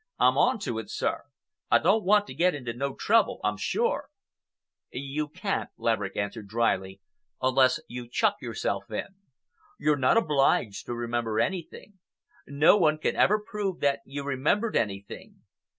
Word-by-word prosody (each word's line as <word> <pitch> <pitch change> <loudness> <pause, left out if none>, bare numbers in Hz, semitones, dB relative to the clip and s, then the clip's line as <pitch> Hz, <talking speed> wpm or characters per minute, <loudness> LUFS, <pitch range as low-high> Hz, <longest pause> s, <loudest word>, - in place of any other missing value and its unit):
"I'm - - +4
on 250 0 +3
to 115 - -3
it, 110 - -8
sir. - - -2 0.4
I - - +6
don't 200 +6 +2
want 205 +2 +4
to - - -9
get 170 +4 +2
into 125 -5 -5
no 135 +3 -3
trouble, 225 -1 +2
I'm 105 - +1
sure." 100 0 -1 0.8
"You 140 +3 -3
can't," 185 +6 -3
Laverick 105 -4 -1
answered 100 +1 -4
dryly, 95 -3 -1 0.4
"unless 130 0 +3
you 120 0 -8
chuck - - +1
yourself 105 -3 -3
in. 105 - -4 0.7
You're 150 0 +2
not 130 - +3
obliged 140 - +1
to 120 - -3
remember 120 -2 -2
anything. 190 - -4 0.5
No 145 +8 +5
one 155 -5 +3
can 155 - -1
ever 210 - +4
prove 210 -4 -4
that 140 -1 +2
you 140 +1 -6
remembered 145 - 0
anything. 100 -2 -4
135 Hz, 150 wpm, -27 LUFS, 115-180 Hz, 0.8 s, I